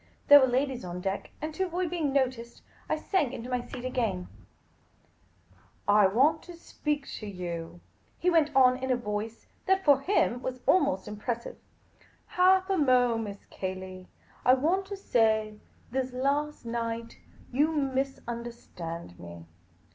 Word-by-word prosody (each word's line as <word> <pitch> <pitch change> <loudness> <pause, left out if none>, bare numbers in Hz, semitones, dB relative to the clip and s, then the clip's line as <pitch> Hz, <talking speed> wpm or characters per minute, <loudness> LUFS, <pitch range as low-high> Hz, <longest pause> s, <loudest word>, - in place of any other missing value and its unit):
There 290 0 +11
were 260 - +4
ladies 260 0 0
on 180 0 -5
deck, 195 +2 -3
and 310 0 -3
to 380 +4 -1
avoid 355 -1 -2
being 320 -5 0
noticed 255 -4 -1 0.3
I - - +2
sank 300 - 0
into 245 +1 -6
my 250 -1 0
seat 245 +1 -8
again, 225 -8 -2 0.8
" - - -38 0.6
I 205 -1 +6
want 275 +11 +3
to 350 - -11
speak 295 -4 -3
to 215 - -7
you," 175 -3 -6 0.4
he - - -3
went 325 -4 +4
on, 255 -1 +6
in 260 0 -4
a 255 - +3
voice 215 0 -4 0.2
that 385 0 +2
(for 285 -3 +6
him) 275 - +1
was 255 0 -4
ahnost 190 - +2
impressive. 225 +3 -4 0.4
" - - -30
Half 375 +1 +5
a 385 - +2
mo'. 250 -4 +3
Miss 205 -3 -6
Cayley. 185 -1 -6 0.4
I 255 - +6
want 355 +8 0
to 400 0 -6
say 220 - +1
— - - -31
this 260 0 -2
last 280 +2 -1
night 230 0 -4 0.2
— - - -24
you 295 +5 +3
misunderstand 235 - -4
me." 85 -1 -10
250 Hz, 160 wpm, -28 LUFS, 210-290 Hz, 0.8 s, There